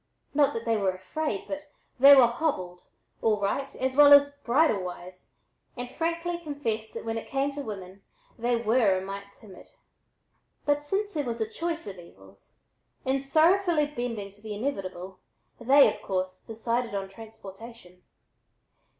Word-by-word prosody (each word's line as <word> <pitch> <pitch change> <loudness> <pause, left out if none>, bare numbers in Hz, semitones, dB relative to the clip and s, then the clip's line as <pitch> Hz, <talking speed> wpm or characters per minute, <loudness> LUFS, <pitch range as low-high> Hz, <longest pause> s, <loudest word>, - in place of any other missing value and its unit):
Not 285 -1 +3
that 230 - -4
they 225 -1 +1
were 195 -2 +1
afraid, 195 +5 -4
but 295 0 -6 0.3
they 280 +2 +10
were 260 -3 +8
"hobbled," 235 - -2 0.4
all 215 -2 +2
right, 270 +7 -2
as 260 0 -2
well 285 0 +8
as 285 0 +6
"bridle 265 -4 +2
wise," 180 0 -9 0.4
and 245 0 -5
frankly 335 +1 -2
confessed 270 -9 -4
that - - -6
when 225 0 -2
it - - -11
came 275 +1 -1
to 285 - -5
women, 195 -5 -8 0.3
they 240 +1 0
were 225 -4 +2
"a - - -3
mite 200 +1 -7
timid." 200 -3 -15 1.0
But 290 0 +1
since 405 +7 -2
there 295 - -1
was 235 -3 -4
a 220 - -1
choice 335 +7 -4
of 190 -3 -8
evils, 95 - -17 0.4
in 265 +1 +1
sorrowfully 315 +1 +2
bending 230 -5 -4
to 205 +1 -22
the 215 -1 -6
inevitable 190 -6 -5 0.4
they, 270 +4 +5
of - - -14
course, 185 -1 -3
decided 230 0 -3
on 195 -1 -3
"transportation." 210 -2 -12
230 Hz, 160 wpm, -27 LUFS, 195-285 Hz, 1.0 s, they